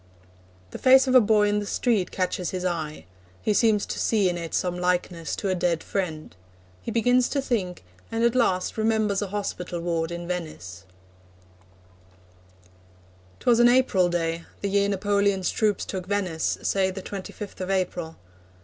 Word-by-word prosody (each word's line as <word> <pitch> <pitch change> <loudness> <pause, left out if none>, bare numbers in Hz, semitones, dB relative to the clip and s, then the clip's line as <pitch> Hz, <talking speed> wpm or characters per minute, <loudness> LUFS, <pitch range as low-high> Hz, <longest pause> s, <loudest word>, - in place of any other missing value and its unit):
The - - -7
face 260 +1 +6
of 260 - 0
a 255 - +8
boy 210 -1 +3
in 205 0 +1
the 205 - -4
street 220 -7 +1
catches 185 -1 -2
his 185 -1 -4
eye. 160 -4 -3 0.4
He 210 - +2
seems 215 -1 +3
to - - -5
see 205 -5 +2
in 175 - -2
it 170 -1 -4
some 180 -1 -1
likeness 180 -2 -1
to 200 - -3
a - - +2
dead 175 -2 0
friend. 160 - -4 0.5
He - - -6
begins 245 +2 +3
to 285 - -1
think, 205 - -2 0.3
and 225 +1 -1
at 235 0 +3
last 220 -5 +1
remembers 215 -2 +1
a 205 - -2
hospital 185 -3 -4
ward 165 -1 -1
in 170 0 -5
Venice: 95 - -6 2.6
'Twas 235 -1 +3
an 240 0 +7
April 240 -8 +3
day, 165 -1 -2 0.2
The 200 - -1
year 200 0 +2
Napoleon's 200 -1 +1
troops 210 -4 0
took 185 -2 -5
Venice 185 -5 -1
say 190 -1 +1
The 190 0 -6
twenty 195 -2 -6
fifth 205 -2 -8
of 185 - -4
April. 180 -4 -2
190 Hz, 165 wpm, -25 LUFS, 175-215 Hz, 2.6 s, a